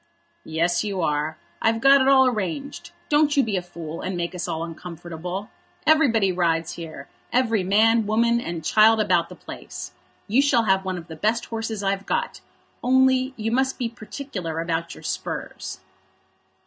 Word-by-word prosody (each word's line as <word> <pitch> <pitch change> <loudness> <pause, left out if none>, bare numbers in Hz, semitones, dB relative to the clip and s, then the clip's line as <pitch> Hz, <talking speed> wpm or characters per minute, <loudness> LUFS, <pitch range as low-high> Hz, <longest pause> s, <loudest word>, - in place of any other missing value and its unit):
"Yes, 165 +2 +1
you 200 -3 -3
are. 150 0 -1 0.2
I've 225 0 +2
got 275 +2 +6
it 260 - +2
all 265 -1 +6
arranged. 245 - -3 0.2
Don't 295 0 +3
you 275 - +6
be 215 -3 -1
a 185 - 0
fool, 165 -2 -8
and 185 -1 -3
make 170 +1 -2
us 180 - -4
all 160 +1 -2
uncomfortable. 175 +3 -7 0.3
Everybody 255 -11 +4
rides 165 -2 0
here; 165 -2 -8 0.2
every 230 -5 +2
man, 220 +3 +3
woman, 235 +2 +2
and 170 -7 -5
child 220 +3 +5
about 175 -5 +2
the - - -10
place. - - -8 0.4
You 235 +6 +4
shall 265 -5 +3
have 190 -2 +2
one 185 -1 -3
of 170 - -8
the 160 - -9
best 220 +8 0
horses 225 -2 -4
I've 195 0 -1
got; - - -2 0.4
only 260 +1 +3
you 225 0 -2
must 265 +2 +1
be 240 -2 -2
particular 215 - -6
about 165 0 -2
your - - -13
spurs." 95 0 -5
205 Hz, 170 wpm, -24 LUFS, 170-235 Hz, 0.4 s, got